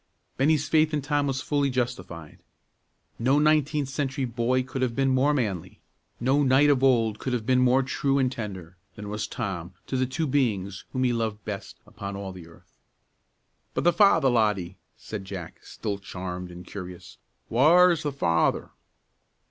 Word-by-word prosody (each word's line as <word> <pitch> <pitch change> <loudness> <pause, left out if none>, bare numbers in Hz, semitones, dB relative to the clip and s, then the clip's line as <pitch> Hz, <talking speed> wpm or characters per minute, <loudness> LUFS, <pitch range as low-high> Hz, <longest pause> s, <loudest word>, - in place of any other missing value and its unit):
Bennie's 145 +2 +2
faith 155 -1 +3
in 145 - -2
Tom 145 0 0
was 135 -1 -1
fully 145 -2 +1
justified. 120 - -4 0.8
No 130 +5 +3
nineteenth 150 -1 +2
century 135 -1 -2
boy 125 +2 0
could 130 +1 -5
have 125 -2 0
been 135 0 +2
more 130 +3 +3
manly, 105 - -2 0.4
no 130 +4 +2
knight 140 +2 +5
of 135 -2 +1
old 115 -5 +3
could 130 - -3
have 115 -3 -2
been 130 +1 +3
more 125 +1 +4
true 135 +1 0
and 130 -2 +2
tender, 95 -7 -7 0.2
than 105 -1 -7
was 105 0 -3
Tom 95 -6 -5
to - - -4
the 130 0 +1
two 160 +6 -2
beings 105 -9 -1
whom 130 -1 -1
he 125 -1 +2
loved 110 -3 -3
best 100 -2 -6
upon 100 0 -7
all 100 -1 -5
the 90 -3 -11
earth. 85 - -20 1.0
"But - - 0
the 175 - +4
father, 165 -9 +5
laddie," 105 -6 0 0.2
said 105 -3 -7
Jack, 95 -4 -8
still 100 -2 -5
charmed 90 -2 -6
and 90 0 -10
curious; 90 -3 -9 0.3
"whaur's 165 +7 +5
the 150 -2 -2
father?" 85 -12 +1
125 Hz, 170 wpm, -26 LUFS, 100-140 Hz, 1.0 s, knight